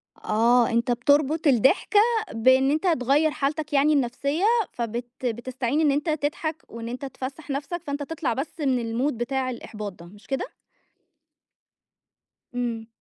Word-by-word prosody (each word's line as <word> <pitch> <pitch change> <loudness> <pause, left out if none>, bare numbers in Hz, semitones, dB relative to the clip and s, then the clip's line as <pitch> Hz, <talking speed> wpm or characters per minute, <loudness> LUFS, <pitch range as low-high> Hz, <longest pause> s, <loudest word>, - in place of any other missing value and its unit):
آه، 235 +2 +3
أنت 235 +2 +1
بتربط 285 +6 +2
الضحكة 270 - +4 0.3
بإن 260 +4 +4
أنت 310 +5 0
تغير 300 -1 +3
حالتك 300 +2 -2
يعني 290 +2 +4
النفسية، 280 +5 0 0.3
فبت 240 +1 -3 0.2
بتستعين 245 +3 -1
إن 305 -2 +4
أنت 290 +3 -1
تضحك 310 +1 -2
وإن 230 0 -7
أنت 250 +3 -5
تفسح 275 +3 -7
نفسك، 290 +5 -3
فأنت 285 0 -3
تطلع 320 -2 -2
بس 280 +7 -5
من 250 -1 0
الMood - - -4
بتاع 255 +2 -2
الإحباط 215 -4 -6
ده، 170 -1 -14
مش 205 +4 -16
كده؟ 270 +7 -2 2.1
امم. 235 -2 -3
265 Hz, 140 wpm, -25 LUFS, 240-295 Hz, 2.1 s, الضحكة